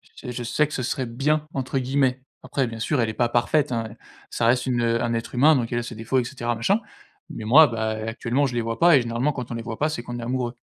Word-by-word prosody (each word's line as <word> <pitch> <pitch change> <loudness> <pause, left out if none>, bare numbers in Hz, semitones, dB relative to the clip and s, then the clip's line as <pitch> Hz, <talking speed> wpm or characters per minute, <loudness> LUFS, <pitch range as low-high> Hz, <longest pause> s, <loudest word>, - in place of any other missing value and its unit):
j 125 - -7
je 120 0 -5
sais 150 +5 +1
que 150 - -10
«ce 130 - -2
serait 130 +1 -2
bien» 150 +6 0
entre 135 0 -2
guillemets. 130 0 +1 0.2
Après, 135 - -1
bien 115 -1 -7
sûr, 135 +4 0
elle 115 - 0
est - - -4
pas 120 +1 +1
parfaite, 130 +4 +1
hein. 115 -1 -2 0.4
Ça 115 - -1
reste 125 +1 +3
une 125 -2 0
un 115 0 +1
être 115 +2 -4
humain. 150 +5 +6
Donc, 120 -3 -1
elle 120 - 0
a - - -4
ses 115 -1 -7
défauts 115 +4 0
et - - 0
cetera, 120 -2 -3
machin. 195 - +1 0.5
Mais, 110 - -7
moi, 150 +7 +8
bah, 110 -2 -2
heu, 110 - -5
actuellement, 120 +4 0
je 125 - -5
les 120 - +1
vois 115 0 -4
pas 170 -2 +6
et - - +3
généralement, 120 +5 -1
quand 125 -3 -6
on 120 - -3
les 115 - -5
voit 110 -1 -6
pas, 155 - +2
c'est 155 -6 -4
qu'on 120 0 -6
est - - -5
amoureux. 125 0 -2
120 Hz, 285 wpm, -24 LUFS, 115-135 Hz, 0.5 s, moi